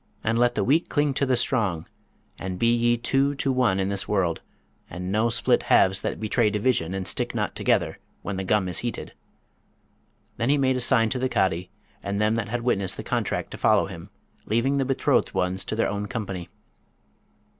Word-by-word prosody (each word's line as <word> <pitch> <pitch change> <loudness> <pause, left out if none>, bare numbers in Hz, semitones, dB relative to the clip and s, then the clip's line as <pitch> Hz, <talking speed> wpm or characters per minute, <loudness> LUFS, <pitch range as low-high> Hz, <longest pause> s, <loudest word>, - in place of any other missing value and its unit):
and 115 +1 +1
let 120 0 +3
the - - +1
weak 155 +7 +2
cling 145 -2 +1
to 140 +1 0
the 130 - +3
strong; 105 -10 0 0.5
and 95 -1 -4
be 115 +4 +3
ye 120 0 +2
two 135 +4 +1
to 135 0 0
one 125 -7 +2
in 95 0 0
this 100 -1 -2
world, 90 -5 0 0.5
and 90 +2 -5
no 110 +3 +2
split 115 - +2
halves 95 0 +4
that - - -3
betray 110 +1 +1
division 105 -5 0
and 95 -1 -4
stick - - -1
not - - -2
together - - 0 0.2
when 100 - -3
the 95 - -3
gum 95 0 +1
is 90 - -1
heated.' 120 -1 -5 1.2
Then 115 +2 0
he 145 - +4
made 130 -2 +2
a - - -1
sign 115 -2 +3
to 130 - -1
the 130 +1 0
Cadi 90 -4 0 0.3
and 100 0 -3
them 105 +1 +2
that 115 -1 -2
had 120 +1 -2
witnessed 100 -6 0
the - - -5
contract - - -2
to - - -8
follow - - +4
him, - - -9 0.4
leaving 130 +6 +1
the 135 - +1
betrothed 135 0 +1
ones 90 +1 0
to - - -3
their 115 - +1
own 105 0 -3
company. 95 -5 -5
110 Hz, 200 wpm, -25 LUFS, 95-125 Hz, 1.2 s, halves